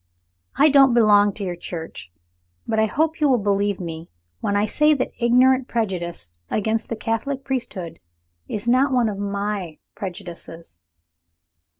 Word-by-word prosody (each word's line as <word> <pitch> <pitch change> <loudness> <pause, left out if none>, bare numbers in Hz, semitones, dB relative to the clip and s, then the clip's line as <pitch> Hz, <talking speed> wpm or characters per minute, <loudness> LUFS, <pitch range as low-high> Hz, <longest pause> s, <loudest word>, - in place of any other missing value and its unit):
I 300 +2 +5
don't 270 -3 +6
belong 205 -3 +5
to 205 - -6
your 180 -2 -3
Church; 165 - -8 0.6
but 220 -1 0
I 220 - +3
hope 315 +7 -1
you 295 - +4
will 255 - +4
believe 200 -2 0
me 165 -2 -7 0.3
when 200 - -1
I 205 +1 +2
say 300 +7 +3
that 255 - -2
ignorant 255 +2 +4
prejudice 175 - -3 0.2
against 220 +1 -1
the 230 - -2
Catholic 230 +5 -3
priesthood 195 -11 -4 0.5
is 210 +2 -5
not 260 +3 +3
one 245 -3 +2
of 200 -2 -5
my 200 -4 -3 0.2
prejudices." 170 - -9
210 Hz, 150 wpm, -22 LUFS, 185-255 Hz, 0.6 s, don't